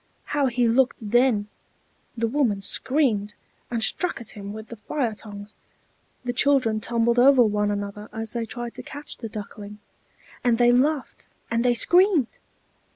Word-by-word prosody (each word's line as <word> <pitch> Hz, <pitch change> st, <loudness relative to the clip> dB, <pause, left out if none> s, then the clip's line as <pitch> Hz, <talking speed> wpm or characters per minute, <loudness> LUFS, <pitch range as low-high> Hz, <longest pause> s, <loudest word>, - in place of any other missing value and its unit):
How 285 Hz, -2 st, +2 dB
he 245 Hz, -1 st, +1 dB
looked 235 Hz, -3 st, +1 dB
then! 240 Hz, -4 st, +3 dB, 0.7 s
The 230 Hz, -, 0 dB
woman 225 Hz, -6 st, 0 dB
screamed, 230 Hz, -6 st, +1 dB, 0.3 s
and 230 Hz, -2 st, -1 dB
struck 360 Hz, +10 st, +1 dB
at 235 Hz, -, -6 dB
him 200 Hz, -1 st, -8 dB
with 220 Hz, +1 st, -9 dB
the 235 Hz, -, -9 dB
fire 230 Hz, +2 st, -2 dB
tongs; 205 Hz, -1 st, -10 dB, 0.7 s
the 245 Hz, -, -1 dB
children 255 Hz, -4 st, +2 dB
tumbled 235 Hz, +2 st, +1 dB
over 260 Hz, 0 st, +7 dB
one 210 Hz, -1 st, +1 dB
another 205 Hz, +1 st, -5 dB
as 225 Hz, 0 st, -5 dB
they 230 Hz, -2 st, -3 dB
tried 240 Hz, +1 st, -6 dB
to -, -, -8 dB
catch 290 Hz, +1 st, -7 dB
the 225 Hz, -, -7 dB
Duckling; 210 Hz, 0 st, -8 dB, 0.7 s
and 240 Hz, -2 st, +3 dB
they 240 Hz, 0 st, +5 dB
laughed 275 Hz, +3 st, 0 dB, 0.2 s
and 230 Hz, 0 st, +1 dB
they 245 Hz, -1 st, +3 dB
screamed! 350 Hz, -, +3 dB
235 Hz, 155 wpm, -24 LUFS, 210-255 Hz, 0.7 s, over